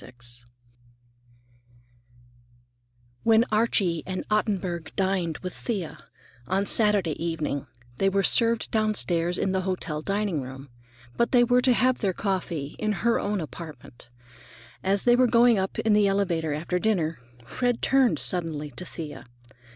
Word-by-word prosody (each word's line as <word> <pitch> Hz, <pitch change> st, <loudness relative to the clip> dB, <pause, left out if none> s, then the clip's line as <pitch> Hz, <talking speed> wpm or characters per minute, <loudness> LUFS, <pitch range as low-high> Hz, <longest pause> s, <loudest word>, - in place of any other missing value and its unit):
IX 120 Hz, -1 st, -10 dB, 2.8 s
When 225 Hz, +1 st, +4 dB
Archie 200 Hz, -6 st, +2 dB
and 185 Hz, 0 st, -4 dB
Ottenburg 185 Hz, -6 st, -1 dB
dined 185 Hz, -4 st, 0 dB
with 185 Hz, -, -4 dB
Thea 200 Hz, -9 st, -4 dB, 0.5 s
on 195 Hz, +2 st, 0 dB
Saturday 200 Hz, -8 st, +2 dB
evening, 155 Hz, -5 st, -3 dB, 0.3 s
they 195 Hz, -, +2 dB
were 195 Hz, 0 st, +1 dB
served 230 Hz, +2 st, +3 dB
downstairs 180 Hz, -6 st, +1 dB
in 190 Hz, -, 0 dB
the 190 Hz, 0 st, 0 dB
hotel 180 Hz, -5 st, -3 dB
dining 195 Hz, -3 st, -1 dB
room, 135 Hz, +2 st, -9 dB, 0.5 s
but 235 Hz, -, +1 dB
they 245 Hz, -2 st, +5 dB
were 245 Hz, +1 st, +3 dB
to 250 Hz, 0 st, +4 dB
have 255 Hz, +1 st, +2 dB
their 195 Hz, -4 st, 0 dB
coffee 170 Hz, -7 st, -3 dB
in 215 Hz, -1 st, 0 dB
her 235 Hz, -, +3 dB
own 205 Hz, -1 st, -1 dB
apartment. 150 Hz, -5 st, -10 dB, 0.7 s
As 195 Hz, +1 st, +1 dB
they 240 Hz, 0 st, +5 dB
were 255 Hz, 0 st, +4 dB
going 235 Hz, -2 st, +4 dB
up 190 Hz, 0 st, -3 dB
in 220 Hz, -, +2 dB
the 210 Hz, -1 st, +4 dB
elevator 180 Hz, -6 st, 0 dB
after 170 Hz, +4 st, -2 dB
dinner, 175 Hz, -8 st, 0 dB, 0.3 s
Fred 245 Hz, -, -1 dB
turned 265 Hz, -2 st, +3 dB
suddenly 160 Hz, -5 st, 0 dB
to 160 Hz, +8 st, -5 dB
Thea. 150 Hz, -7 st, -8 dB
190 Hz, 140 wpm, -26 LUFS, 160-215 Hz, 2.8 s, they